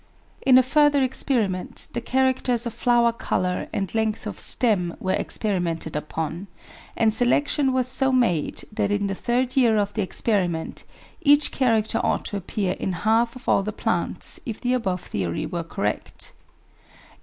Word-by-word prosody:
In 255 -1 +6
a 255 - +6
further 290 +1 +3
experiment 235 -8 -1
the 240 - -2
characters 255 -1 +1
of 235 - -4
flower 235 0 +3
colour 185 -6 -2
and 195 -3 -3
length 220 -1 -1
of 210 - -6
stem 190 -8 +3
were 185 - -1
experimented 175 -7 -2
upon, 160 +4 -4 0.5
and 220 -2 +3
selection 265 +4 +2
was 255 -1 +1
so 265 +1 +2
made 230 - +1
that 205 -1 -1
in 205 0 0
the 195 - -1
third 245 +5 -1
year 235 -5 +4
of 205 0 0
the 220 - -1
experiment 185 -4 -1 0.4
each 290 0 +4
character 225 -5 +1
ought - - 0
to 205 - -3
appear 195 0 -2
in 190 - -2
half 230 +2 +2
of 255 +1 -12
all - - +4
the 210 +2 -3
plants - - -1
if 225 -3 -6
the 250 0 0
above 190 -8 -1
theory 90 -4 -3
were 170 -1 -4
correct. 105 -10 -4
220 Hz, 160 wpm, -24 LUFS, 185-255 Hz, 0.5 s, In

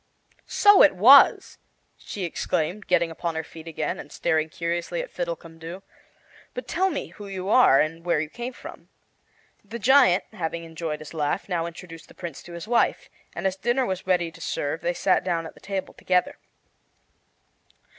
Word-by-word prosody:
"So 410 -1 +6
it 295 - +6
was," 255 +9 +6 0.4
she 200 - -7
exclaimed, 175 +3 -2
getting 170 -2 +2
upon 165 0 -4
her 160 - -2
feet 160 +1 -12
again, 155 -2 -3
and 145 - -10
staring 160 +1 0
curiously 170 - -3
at - - -5
Fiddlecumdoo. 180 - -6 0.7
"But - - -6
tell 380 +2 +1
me 310 - -4
who 205 - -11
you 190 0 -5
are 220 - +6
and 165 +2 -1
where 175 -3 +1
you 155 - -2
came 240 +10 -6
from." - - -12 0.7
The 215 +3 -7
giant, 250 -5 +5
having 165 0 -4
enjoyed 160 -2 -5
his 155 - -10
laugh, 155 +4 -2
now 170 -3 -1
introduced 165 -1 -11
the - - -18
Prince 170 -5 -7
to 175 - -12
his 170 +2 -7
wife, 240 0 +1 0.2
and - - -5
as 190 -1 +1
dinner 240 +6 0
was 190 -3 -4
ready 175 -3 +1
to - - -15
serve 145 +3 -3
they 175 +1 -1
sat 185 - +2
down 170 -3 -1
at - - -9
the - - -18
table 195 -1 -5
together. 180 -1 0
175 Hz, 175 wpm, -25 LUFS, 165-205 Hz, 0.7 s, So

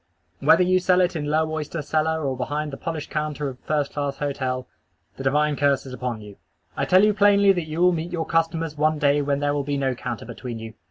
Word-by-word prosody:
Whether 185 - +5
you 185 +1 +3
sell 180 0 +3
it 180 -1 +2
in 150 -2 -2
low 155 +2 +1
oyster 155 0 -4
cellar 160 +1 0
or 135 -1 -1
behind 145 +3 -3
the - - -5
polished 160 -2 -5
counter 150 -2 -2
of 130 -1 -10
first 150 -2 -1
class 145 -1 -2
hotel, 130 -3 -2 0.5
the 135 - -7
divine 150 +2 +2
curse 140 -1 +1
is 130 - -8
upon 125 -3 -4
you. 105 -1 -12 0.4
I - - -1
tell 185 +2 +5
you 210 0 +4
plainly 200 -1 +5
that 175 -4 -2
you 155 +2 -3
will 180 0 +5
meet 170 +1 -3
your 165 -2 -2
customers 165 -1 0
one 155 +1 +1
day 145 0 +3
when 140 0 -1
there 145 0 +1
will 145 - 0
be 140 0 -2
no 135 -2 0
counter 120 -1 -5
between 120 0 -7
you. 110 0 -8
150 Hz, 235 wpm, -23 LUFS, 135-165 Hz, 0.5 s, Whether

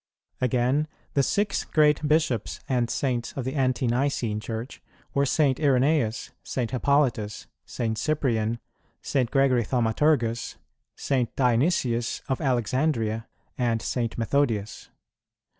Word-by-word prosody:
[16:1] - - +3
Again, 125 +5 +1 0.3
the 140 - +3
six 200 +9 0
great 150 -1 +3
Bishops 150 -8 +1
and 125 -3 +1
Saints 125 -4 -1
of 135 - -4
the 130 - -2
Ante 130 -2 +1
nicene 120 -3 0
Church 115 +3 -6 0.3
were 140 0 +2
St. 135 -2 +2
Irenæus, 135 -4 +2
St. 120 -3 -3
Hippolytus, 125 -5 +1 0.2
St. 115 -2 -2
Cyprian, 115 -5 0 0.5
St. 130 -4 0
Gregory 135 -3 +3
Thaumaturgus, 115 0 +1 0.4
St. 130 -4 -1
Dionysius 125 -2 +1
of 130 - -1
Alexandria, 120 -3 0 0.3
and 115 -2 +1
St. 115 0 -2
Methodius. 115 -4 -1
125 Hz, 115 wpm, -26 LUFS, 115-140 Hz, 0.5 s, 16:1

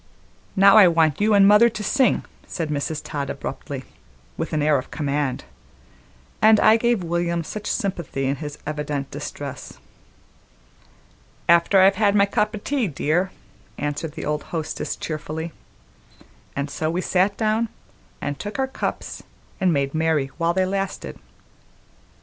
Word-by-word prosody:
"Now 195 +1 +7
I 205 -4 +9
want 165 -1 +2
you 210 0 +4
an' 200 -1 +7
mother 210 +4 +7
to 215 -2 -6
sing," 260 +5 +2 0.2
said 165 -3 -3
Mrs. 150 +1 -2
Todd 145 -3 -4
abruptly, - - -5 0.5
with 165 - -4
an 155 -2 0
air 150 -2 +3
of 130 - -9
command, 145 -3 -2 1.0
and 215 0 +6
I 215 - +6
gave 235 -3 +1
William 170 0 -1
much 215 -1 -6
sympathy 170 - -2
in 135 +1 0
his 150 -1 -7
evident 150 -2 -3
distress. - - -7 1.7
"After 170 +3 +5
I've 195 0 +5
had 205 -1 +4
my 200 -1 +5
cup 210 +1 0
o' - - -4
tea, 255 +2 -1
dear," 165 +4 0 0.5
answered 150 +1 -3
the - - -6
old 150 0 -1
hostess 160 -2 -3
cheerfully; 160 +1 -5 1.0
and 140 +1 -3
so 155 +1 -2
we 175 +3 -1
sat 190 +2 +1
down 220 +1 +1 0.5
and 145 -1 -3
took 205 +4 -5
our 265 - +1
cups 265 - -4 0.4
and 185 -2 +3
made 140 -3 0
merry 155 -4 +1
while 170 +1 +1
they 190 0 +2
lasted. 195 +1 -3
170 Hz, 150 wpm, -23 LUFS, 150-205 Hz, 1.7 s, I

